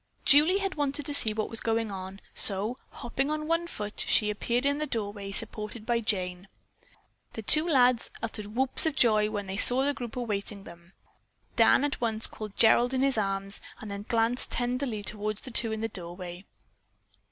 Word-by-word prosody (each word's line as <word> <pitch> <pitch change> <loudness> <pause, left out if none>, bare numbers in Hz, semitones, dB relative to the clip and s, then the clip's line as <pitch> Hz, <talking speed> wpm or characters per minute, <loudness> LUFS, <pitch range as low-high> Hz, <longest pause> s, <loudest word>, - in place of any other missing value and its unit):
Julie 305 +7 +5
had 390 -1 -3
wanted 290 -1 -3
to 290 - -2
see 225 -6 +7
what 215 0 -3
was 225 - -2
going 225 -1 -2
on, 190 0 -9
so 210 +5 +4
hopping 270 +4 -4
on 305 0 -3
one 335 +1 -1
foot, 210 -9 -8
she 210 0 +1
appeared 240 +5 -3
in 285 +1 0
the 305 - -3
doorway, 205 -5 -5
supported 215 +2 -3
by 240 0 0
Jane. 185 -4 -3 0.9
The 225 - -8
two 310 +10 +4
lads 250 -5 +2
uttered 215 -2 -6
whoops 265 +5 +4
of 310 - -2
joy 215 -5 +2
when 205 -2 -5
they 190 0 -6
saw 250 +4 +7
the 285 +1 0
group 240 -5 -8
awaiting 205 -4 -5
them. 170 +1 -16 0.6
Dan - - +4
at 290 -3 -3
once 225 -2 +3
caught 215 -2 -5
Gerald 240 +3 +3
in 260 - 0
his 275 -1 +1
arms 195 -1 +1 0.2
and 215 - -9
then 200 +1 -8
glanced 230 +2 0
tenderly 245 -3 -3
toward 210 +1 -4
the 255 - -8
two 230 -1 0
in 220 0 -5
the 225 - -2
doorway. 175 -1 -9
225 Hz, 185 wpm, -27 LUFS, 205-260 Hz, 0.9 s, see